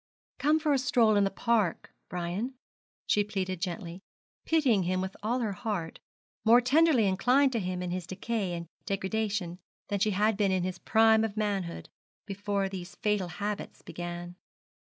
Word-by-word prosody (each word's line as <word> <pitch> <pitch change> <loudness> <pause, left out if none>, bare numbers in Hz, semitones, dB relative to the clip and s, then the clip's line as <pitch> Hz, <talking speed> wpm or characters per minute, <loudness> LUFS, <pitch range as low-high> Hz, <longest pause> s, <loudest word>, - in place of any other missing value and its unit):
'Come 300 +4 +4
for 310 -2 +1
a 275 - +3
stroll 235 -4 +3
in 200 -1 +4
the - - +1
park, 215 -3 0 0.2
Brian,' 180 +9 -3 0.5
she 205 - +3
pleaded 185 -3 -3
gently, 180 -1 -4 0.4
pitying 275 -11 +3
him 185 +1 0
with 190 +1 -4
all 235 +4 0
her 220 -3 -1
heart, 195 -5 -4 0.4
more 230 +2 +7
tenderly 270 -1 +4
inclined 250 +8 +3
to 235 - 0
him 180 -2 -3
in 180 - -3
his 180 -1 -4
decay 195 0 -2
and 170 0 -4 0.2
degradation 195 -2 -2 0.3
than 205 - 0
she 215 - +2
had 210 +1 +2
been 200 -2 +2
in 185 -1 +1
his 185 0 -3
prime 220 0 +4
of 220 -1 -3
manhood, 195 - -2 0.4
before 200 0 -1
these 185 -2 -7
fatal 210 -5 0
habits 200 +4 -5
began. 175 0 -6
200 Hz, 165 wpm, -29 LUFS, 185-225 Hz, 0.5 s, more